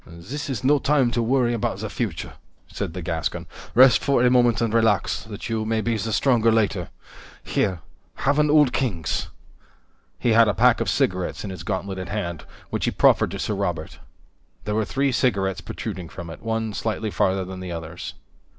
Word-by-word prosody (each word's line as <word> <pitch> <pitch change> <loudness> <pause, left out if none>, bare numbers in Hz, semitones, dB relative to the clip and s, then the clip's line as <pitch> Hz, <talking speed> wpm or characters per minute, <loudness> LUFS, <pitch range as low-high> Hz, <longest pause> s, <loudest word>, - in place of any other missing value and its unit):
"This 105 - -7
is 130 -3 -3
no 145 +2 +4
time 135 -4 +2
to 120 - 0
worry 120 0 +2
about 105 -4 -1
the 110 +2 -4
future," 105 -6 -4 0.3
said - - -5
the 90 - -5
Gascon. 80 -1 -2 0.3
"Rest 125 0 +7
for 135 -3 +3
a 125 - +5
moment 120 -4 +4
and 115 -2 0
relax, 110 -4 +2
that 105 -2 -7
you 110 -2 -1
may 110 0 0
be 115 +1 0
the 110 +1 -2
stronger 115 -2 +3
later. 105 -5 +1 0.5
Here 90 -4 -1 0.3
have 145 +2 +1
an 150 0 +3
Old 150 -4 +5
Kings." 90 - -1 0.9
He 120 - +1
had 115 0 +6
a 105 - +1
pack - - +4
of - - 0
cigarettes 90 -1 0
in 100 - -5
his 90 -3 -7
gauntleted 95 -1 -4
hand, 85 -8 -4 0.3
which - - -1
he - - +2
profferred - - +4
to - - -5
Sir 105 - -2
Robert. 90 -6 -3 0.7
There 105 - -1
were 110 0 +1
three 135 +5 0
cigarettes 100 -7 0
protruding 90 -3 -6
from 85 -2 -8
it, - - -10
one 110 -1 -2
slightly 110 0 -2
farther 95 -1 +1
than 95 0 -7
the 90 -1 -6
others. 85 0 -6
110 Hz, 190 wpm, -23 LUFS, 95-120 Hz, 0.9 s, Rest